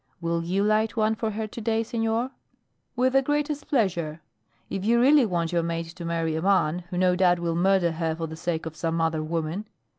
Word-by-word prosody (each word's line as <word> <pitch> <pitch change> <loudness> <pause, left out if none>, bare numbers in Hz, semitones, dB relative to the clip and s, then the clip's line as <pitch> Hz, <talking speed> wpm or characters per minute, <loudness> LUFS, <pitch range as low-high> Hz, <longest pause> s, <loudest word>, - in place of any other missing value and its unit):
Will 170 0 -1
you 185 +4 0
light 215 +2 +1
one 220 0 +3
for 220 0 -2
her 220 +1 -3
to 215 +2 -8
day, 225 +1 +1
senor?" 225 +2 -1 0.6
"With 255 +1 +2
the 270 - +5
greatest 295 +1 -1
pleasure; 170 - 0 0.5
if 190 - -4
you 235 +3 +3
really 270 0 +5
want 170 -3 -1
your 170 -1 +2
maid 165 0 -2
to 175 +1 -9
marry 165 -1 -1
a 160 - -2
man 180 -3 +2
who 180 - -4
no 180 0 +3
doubt 180 -1 +4
will 170 -1 -1
murder 180 0 +3
her 160 0 -2
for 165 0 -3
the 160 0 -7
sake 165 0 -3
of 160 -1 -6
some 165 0 -1
other 160 -1 +1
woman." 165 +5 -3
180 Hz, 215 wpm, -26 LUFS, 165-220 Hz, 0.6 s, the